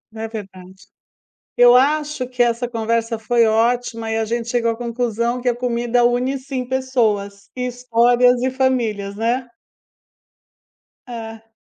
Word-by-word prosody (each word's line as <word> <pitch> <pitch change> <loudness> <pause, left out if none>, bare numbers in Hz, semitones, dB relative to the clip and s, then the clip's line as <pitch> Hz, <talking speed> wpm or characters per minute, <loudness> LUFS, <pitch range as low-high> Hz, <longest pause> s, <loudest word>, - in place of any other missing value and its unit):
É 225 0 -4
verdade. 190 -3 -10 0.7
Eu 245 0 +7
acho 290 0 +1
que 250 0 -2
essa 240 +1 0
conversa 230 0 -1
foi 230 +1 +2
ótima 230 0 0
e 220 - 0
a 225 - 0
gente 235 +1 -3
chegou 235 -2 +1
à 225 - -6
conclusão 235 0 -2
que 250 - -5
a 240 - 0
comida 240 0 0
une 250 +3 +1
sim 260 -1 -5
pessoas, 220 -7 -1
histórias 245 0 +2
e 260 - +1
famílias, 235 -7 -1
né. 240 +4 -1 1.6
É. 225 -2 -9
240 Hz, 135 wpm, -20 LUFS, 225-250 Hz, 1.6 s, Eu